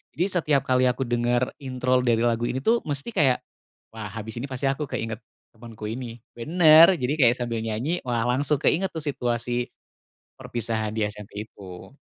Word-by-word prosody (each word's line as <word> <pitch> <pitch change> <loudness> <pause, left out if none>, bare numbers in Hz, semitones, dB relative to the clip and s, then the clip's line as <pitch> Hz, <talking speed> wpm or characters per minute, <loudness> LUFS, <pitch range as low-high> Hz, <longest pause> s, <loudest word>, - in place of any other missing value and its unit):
Jadi 175 - +1
setiap 150 -6 +2
kali 130 0 +3
aku 125 +2 0
dengar 120 0 0
intro 130 -1 0
dari 120 -2 +2
lagu 120 0 +1
ini, 125 - -2
tuh, 230 +6 +3
mesti 145 +10 -4
kayak, 140 -9 +3 0.5
"Wah, 105 -2 -6
habis 110 +2 -7
ini 135 - -4
pasti 130 +1 -3
aku 135 +1 -1
keinget 115 0 -4 0.3
temenku 115 -2 -10
ini." 120 -1 -6 0.2
Benar, 165 +6 +6
jadi 130 0 -1
kayak 120 -3 +5
sambil 120 -2 -3
nyanyi, 115 +10 -2
wah, 120 -2 -1
langsung 140 +4 +2
keinget, 185 +6 +1
tuh, 160 -2 -6
situasi 120 -3 -2 0.7
perpisahan 110 -2 -2
di 110 - -1
SMP 105 0 -7
itu. 90 -4 -12
125 Hz, 170 wpm, -25 LUFS, 115-140 Hz, 0.7 s, Benar